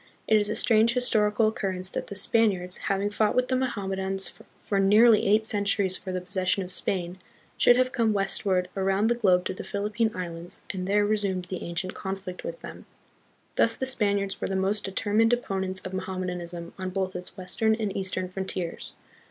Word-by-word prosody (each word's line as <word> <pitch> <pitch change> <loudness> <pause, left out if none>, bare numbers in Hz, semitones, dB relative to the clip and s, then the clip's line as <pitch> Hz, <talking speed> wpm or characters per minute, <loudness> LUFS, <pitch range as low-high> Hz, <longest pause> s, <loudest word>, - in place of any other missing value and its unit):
It 220 - +4
is 205 -1 +3
a 215 - -1
strange 230 +1 +3
historical 215 -3 +3
occurrence 190 -3 -3
that - - -4
the 200 - -7
Spaniards, 195 -3 +3
having 200 +1 0
fought 210 0 +1
with 250 0 +1
the 260 - +2
Mohammedans 195 -6 -2 0.3
for 200 - 0
nearly 210 +3 +5
eight 215 +2 +3
centuries 200 -3 +1
for 190 - -5
the 185 - -2
possession 185 +1 0
of 180 - -6
Spain, 180 -1 -3 0.4
should 245 - +5
have 255 0 +2
come 230 -5 +1
westward 195 -2 0
around 195 +3 +1
the - - +5
globe 185 -6 +2
to - - -2
the - - -7
Philippine 210 +2 -1
Islands 170 -1 -6
and 185 -1 -4
there 205 +1 +3
resumed 200 -4 -1
the 185 - -4
ancient 170 +2 -4
conflict 190 -1 -6
with - - -6
them. - - -10 0.7
Thus 230 0 +4
the 260 - -2
Spaniards 200 -6 0
were - - -1
the 190 - -2
most 195 +2 0
determined 215 +4 +1
opponents 190 -5 -1
of 185 - -7
Mohammedanism 180 -2 -4
on 185 0 -3
both 190 0 -2
its 180 0 -8
western 220 +4 0
and 215 -3 -3
eastern 185 -1 -2
frontiers. 185 -2 -5
195 Hz, 185 wpm, -26 LUFS, 185-215 Hz, 0.7 s, nearly